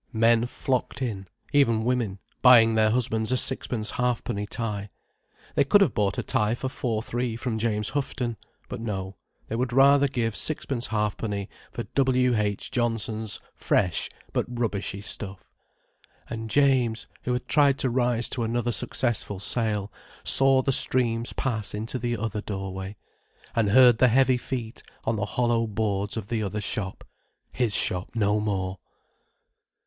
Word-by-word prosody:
Men 115 +1 +3
flocked 130 -1 -2
in—even 110 +3 0
women, 120 -5 0 0.2
buying 115 -3 +7
their 110 -1 +4
husbands 110 -1 +1
a 130 - +3
sixpence 120 -4 -2
halfpenny 120 -4 -1
tie. 105 -3 -4 0.6
They - - +4
could 200 +9 +5
have 180 -10 +3
bought 100 -2 0
a - - -1
tie 105 +2 +1
for 130 +2 -3
four 115 -4 -2
three 120 -1 -2
from 115 -1 -3
James 105 -2 0
Houghton. 125 -4 -2 0.3
But 125 - -6
no, 95 -4 -4 0.3
they 115 - -3
would 125 +1 -1
rather 140 +2 +6
give 115 -5 -1
sixpence 135 -5 -2
halfpenny 105 -1 -2 0.2
for 120 - -4
W.H. 125 -4 +1
Johnson's 115 -2 -1
fresh 90 -5 0 0.2
but - - 0
rubbishy 105 -5 -2
stuff. 100 -2 -6 0.8
And 115 -1 -5
James, 130 -4 +2 0.2
who 125 - -1
had 125 - -3
tried 140 -2 +4
to 130 - 0
rise 120 -1 +1
to 125 - -2
another 120 +1 0
successful 115 -5 -2
sale, 105 -1 -1 0.3
saw 135 -1 +4
the 135 - +1
streams 120 -3 +1
pass 110 -6 -2
into 110 +4 -3
the 120 0 -1
other 105 -1 -3
doorway, 95 -1 -5 0.6
and 110 -3 +2
heard 120 +1 +7
the 130 - +6
heavy 130 +1 +4
feet 120 -3 -5 0.2
on 115 - +1
the 100 - -1
hollow 115 +1 +1
boards 105 -1 -2
of 105 -3 -5
the 115 -2 -1
other 105 0 -2
shop: 100 -2 -4 0.5
his 120 -5 0
shop 90 +1 +2
no 105 -1 +2
more. 95 -3 -2
115 Hz, 150 wpm, -26 LUFS, 105-125 Hz, 0.8 s, buying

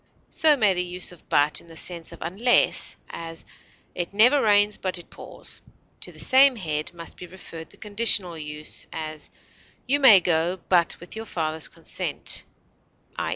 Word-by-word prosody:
So 305 -2 +4
may 210 -6 +4
the 180 0 0
use 180 +1 -4
of 175 - -17
but 145 +1 +2
in - - -20
the 165 -1 -12
sense 170 -1 -2
of 170 - -9
unless; 205 +9 +1
as, 165 0 -8 0.5
"it 175 +2 -4
never 250 +7 +6
rains 205 -1 +3
but 185 -1 -2
it 175 - -9
pours." - - -9 0.4
To - - -6
the - - -14
same 265 0 +6
head 155 -7 -3
must 170 -1 -9
be 180 - -10
referred 170 -2 -11
the - - -15
conditional 205 -4 +1
use; 150 -1 -4
as, 155 -1 -6 0.6
"you 280 +3 +2
may 230 -8 +9
go, 175 +1 0
but 175 -2 +2
with 175 - -9
your 220 0 -7
father's 160 -3 -2
consent" - - -3 0.7
(_i. - - -2
180 Hz, 170 wpm, -24 LUFS, 165-210 Hz, 0.7 s, may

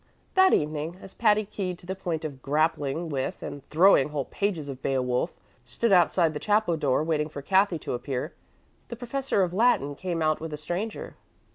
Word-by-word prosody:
That 375 0 +6
evening, 155 +3 0
as 195 - -12
Patty, 215 -2 +3
keyed 190 -3 -4
to 175 - -16
the 190 - -3
point 170 -4 -4
of 140 -4 -6
grappling 150 +2 0
with 135 -3 -3
and 145 - -7
throwing 165 -3 +5
whole 145 -3 -3
pages 185 -8 -2
of 135 -2 -7
"Beowulf," 125 -2 0 0.3
stood 125 - -1
outside 175 -2 +4
the 150 - -4
chapel 210 -3 +2
door 145 -2 +1
waiting 155 -1 0
for 140 -2 -8
Cathy 190 +1 +3
to 155 - -5
appear, 130 +4 -4 0.5
the 235 - -6
professor 245 -3 -1
of 175 -1 -2
Latin 195 - +2
came 170 +2 -3
out 155 0 +1
with 160 -1 -5
a - - -3
stranger. 180 +8 -5
160 Hz, 185 wpm, -27 LUFS, 145-195 Hz, 0.5 s, That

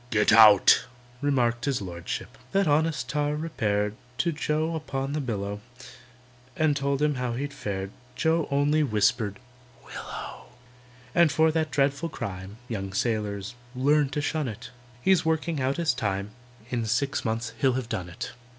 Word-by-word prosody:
"Get 105 -2 +3
out!" 110 -3 +8 0.4
remarked 125 -4 +1
his 140 -3 0
Lordship. 85 -4 -5 0.2
That 195 -2 +3
honest 150 -4 +1
tar 145 +2 0
repaired 105 -10 -1 0.2
To 170 - +1
JOE 155 +1 -1
upon 140 -3 -3
the 150 - -1
billow, 105 -5 -3 0.9
And 155 -2 +2
told 140 0 0
him 150 0 +3
how 125 -2 -1
he'd 140 +3 -3
fared. 100 -7 -4 0.2
JOE 160 +4 +1
only 145 +2 +2
whispered, 105 -4 +1 0.5
"Willow!" - - -8 0.7
And 170 -3 +5
for 160 +2 +4
that 160 0 0
dreadful 140 +3 +1
crime 100 -4 -6
(Young 95 -5 -4
sailors, 105 -1 -1 0.2
learn 145 +2 +3
to 145 +2 -2
shun 150 -1 -1
it) 110 -3 -7 0.3
He's 190 -2 +4
working 160 -1 0
out 130 +1 0
his 170 -2 +2
time; 100 -1 -2 0.4
In 120 -3 -1
six 140 +6 0
months 115 +1 -2
he'll 130 -2 +3
have 130 -2 -2
done 95 -7 -4
it. 85 - -6
135 Hz, 150 wpm, -27 LUFS, 105-150 Hz, 0.9 s, out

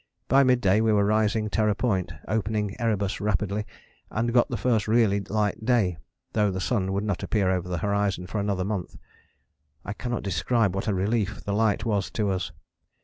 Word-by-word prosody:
By 135 - +5
mid 125 -2 +3
day 100 +1 +3
we 110 0 +3
were 100 -1 +3
rising 110 +1 +1
Terror 105 -1 +2
Point, 95 -8 0 0.2
opening 105 -1 -1
Erebus 105 -4 -1
rapidly, 105 +1 -1 0.4
and 115 +2 -1
got 120 -1 +4
the - - -2
first 115 -4 +1
really 110 -3 +3
light 105 +2 -1
day, 110 - +2 0.3
though 105 -2 +2
the 95 -1 -3
sun 95 0 0
would 100 +1 -1
not 105 -4 -2
appear 100 -4 +1
over 90 -1 -2
the 90 - -1
horizon 100 -3 0
for 105 +3 -3
another 100 -2 -1
month. 100 -3 -3 0.9
I 100 - -3
cannot 120 +2 -4
describe 100 +3 +1
what 95 +3 -3
a 105 - +2
relief 105 +2 -1
the 100 - -2
light 110 +1 +1
was 105 -4 0
to 105 -3 +1
us. 95 -1 -2
105 Hz, 190 wpm, -26 LUFS, 95-110 Hz, 0.9 s, By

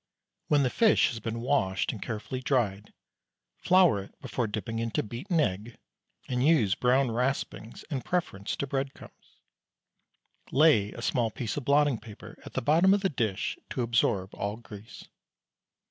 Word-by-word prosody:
When 145 -2 +3
the 125 - +1
fish 225 -2 +4
has 115 - -5
been 115 +1 -4
washed 120 -8 0
and 105 - -8
carefully 120 +3 -5
dried, 105 -7 -1 0.7
flour 180 - +4
it 95 - -14
before 120 -3 -2
dipping 110 +2 -4
into 115 -1 -1
beaten 130 - -2
egg, 110 -3 -1 0.5
and 125 -1 -1
use 135 - +4
brown 125 +2 +2
raspings 125 -1 -3
in 140 -5 -4
preference 120 - -2
to - - -3
breadcrumbs. 135 0 -6 1.1
Lay 130 -9 +4
a 115 - -8
small 120 -1 +1
piece 110 -1 -4
of 145 - -5
blotting 145 -4 +3
paper 105 -2 -12
at - - -11
the - - -2
bottom 170 +8 +5
of 205 - -2
the 195 - +1
dish 110 - -2
to 125 - -2
absorb 110 -5 +1
all 100 +2 -3
grease. 110 -2 -12
120 Hz, 155 wpm, -28 LUFS, 105-140 Hz, 1.1 s, bottom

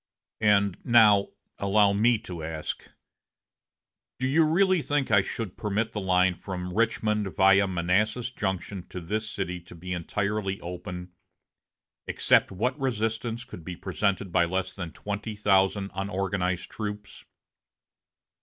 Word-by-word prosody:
"And 100 -3 +3
now 110 -5 +6 0.3
allow 100 0 +4
me 115 +3 +4
to 85 -6 -7
ask, 80 -1 -5 1.3
do 130 - -2
you 155 +5 +4
really 180 +3 +3
think 145 -4 -1
I 100 -1 +6
should 100 0 -5
permit 105 +1 -1
the 105 - -4
line 90 -1 +3
from 90 0 -6
Richmond 105 -3 0
via 100 +1 +5
Manassas 105 +7 0
Junction 95 -4 -4
to 90 - -6
this 110 +6 -3
city 90 -4 -3
to 85 0 -14
be 90 +2 -5
entirely 100 +3 -2
open, 90 +1 -7 1.0
except - - +3
what 125 +9 -1
resistance 115 -2 -2
could 85 - -11
be 90 +1 -6
presented 95 +2 -1
by 85 -1 +4
less 95 +1 -2
than 90 -4 -6
twenty 105 +4 -5
thousand 100 -1 +2
unorganized 95 -2 -2
troops? 105 -2 -6
100 Hz, 130 wpm, -27 LUFS, 90-110 Hz, 1.3 s, now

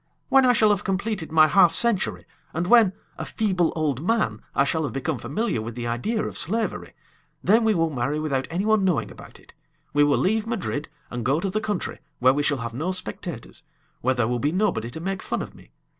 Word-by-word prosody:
When 270 -1 +5
I 250 - +5
shall 215 -3 +4
have 205 0 0
completed 195 -3 -2
my 155 -1 +6
half 175 0 +5
century, 235 -5 +2 0.3
and 170 +2 0
when, 220 -1 +5 0.3
a - - -3
feeble 185 -6 0
old 150 -5 -1
man, 215 - 0
I 135 - +4
shall 160 +3 0
have - - -5
become 135 0 -2
familiar 220 - -2
with 115 +1 -6
the 120 -1 -5
idea 120 - -1
of - - -4
slavery, 220 +7 -2 0.5
then 225 +4 +4
we 220 -1 +3
will 165 -1 +1
marry 135 +3 -1
without 140 -4 -1
anyone 200 +5 +1
knowing 180 -5 0
about - - -13
it. - - -20 0.4
We 145 0 +4
will 145 -1 +3
leave 220 +3 +1
Madrid, 190 -10 -3 0.2
and 120 -1 -4
go 135 +6 +1
to 195 +2 -2
the 215 +2 -1
country, 210 -4 -3 0.2
where 130 +1 +4
we 145 - 0
shall 145 -1 +1
have 115 -1 -5
no 155 +9 -2
spectators, 185 - -6 0.4
where 130 +1 +1
there 120 -2 +1
will 120 0 -1
be 145 +5 0
nobody 180 - 0
to 140 - -7
make 190 +3 -3
fun - - -3
of - - -10
me. - - -18
165 Hz, 220 wpm, -24 LUFS, 135-210 Hz, 0.5 s, my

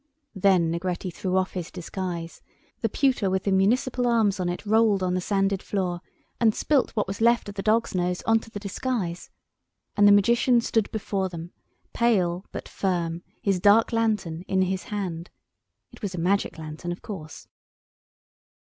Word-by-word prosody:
Then 185 -4 +3
Negretti 175 +1 -3
threw 185 +2 -1
off 185 0 0
his 175 -3 -5
disguise—the 175 -2 -6
pewter 260 -8 +1
with 190 0 0
the 200 - 0
municipal 245 +6 +2
arms 220 -5 +2
on 180 -1 0
it 175 +4 -5
rolled 215 -2 +3
on 180 -1 0
the 185 - 0
sanded 195 0 0
floor, 180 -3 -2 0.4
and 225 -2 +3
spilt 290 -4 +2
what 210 - +1
was 195 +3 -6
left 235 0 +3
of - - -7
the 200 - -4
dog's 220 +3 +1
nose 180 -1 -1
on 225 0 +3
to 225 - -14
the 205 - -6
disguise—and 205 -1 -3
the - - +8
Magician 235 +4 +4
stood 225 -2 0
before 200 -3 -2
them, 170 0 -8 0.4
pale 190 -7 +1
but - - -6
firm, 175 -3 -2 0.2
his 195 -3 +1
dark 210 +5 +5
lantern 215 -8 0
in 190 0 +2
his 185 0 -2
hand. 185 -7 -4 0.6
It - - -16
was 195 -4 -3
a - - -4
magic 190 +3 0
lantern, 160 +2 -6
of 175 - -7
course. 160 -7 -8
195 Hz, 165 wpm, -25 LUFS, 180-220 Hz, 0.6 s, the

